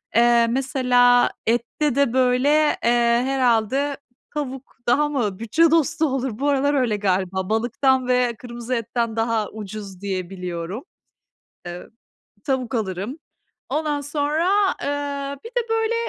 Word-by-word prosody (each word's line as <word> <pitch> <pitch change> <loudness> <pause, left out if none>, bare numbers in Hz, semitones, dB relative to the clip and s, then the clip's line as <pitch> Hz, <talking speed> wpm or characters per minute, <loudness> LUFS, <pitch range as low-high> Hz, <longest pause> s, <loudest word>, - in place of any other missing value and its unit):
Eee, 235 0 +5
mesela 250 -1 +3 0.2
ette 240 +4 0
de, 280 -4 +2
böyle, 255 +1 +3 0.3
eee, 235 0 +3
herhâlde 265 +1 +1 0.4
tavuk 270 -3 -5
daha 295 +5 +3
mı 220 -9 -2
bütçe 310 +9 +3
dostu 325 0 +2
olur? 265 -5 -2
Bu 285 +1 +1
aralar 285 +1 +2
öyle 250 -7 +1
galiba. 190 -1 -1
Balıktan 245 +4 +1
ve 250 -1 +2
kırmızı 240 0 -5
etten 230 0 -2
daha 225 -2 0
ucuz 205 -3 -8
diye 190 -3 -3
biliyorum. 180 +4 -5 0.8
Eee, 175 0 -7 0.6
tavuk 265 -2 -1
alırım. 205 - -3 0.5
Ondan 295 0 -1
sonra, 295 +4 0 0.3
eee, 280 -1 -3
bir 460 - -6
de, 485 -2 -2
böyle, 450 0 +1
250 Hz, 125 wpm, -22 LUFS, 225-280 Hz, 0.8 s, Eee